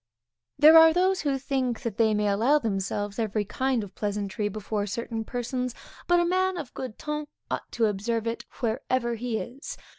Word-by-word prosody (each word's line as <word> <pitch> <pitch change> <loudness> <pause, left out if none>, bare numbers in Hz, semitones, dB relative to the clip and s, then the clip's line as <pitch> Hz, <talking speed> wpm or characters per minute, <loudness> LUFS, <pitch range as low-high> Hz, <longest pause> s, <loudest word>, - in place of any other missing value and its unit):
There 315 +2 +9
are 320 0 +7
those 375 +2 +2
who 280 -2 0
think 260 -3 -1
that 230 -4 -3
they 220 -2 +3
may 210 0 +1
allow 225 +9 +3
themselves 205 -3 -2
every 215 -1 0
kind 255 +2 0
of 200 -2 -10
pleasantry 205 0 -2
before 210 0 -3
certain 225 +2 -3
persons; 245 +1 -3 0.3
but 350 0 +5
a 345 - +3
man 370 +1 +1
of 300 -7 -6
good 255 -5 -6
ton 300 0 -4 0.2
ought - - -4
to 230 - +2
observe 220 +2 -1
it 230 0 -3 0.2
wherever 240 +1 0
he 235 0 -2
is. 260 +6 -7
235 Hz, 180 wpm, -27 LUFS, 215-275 Hz, 0.3 s, There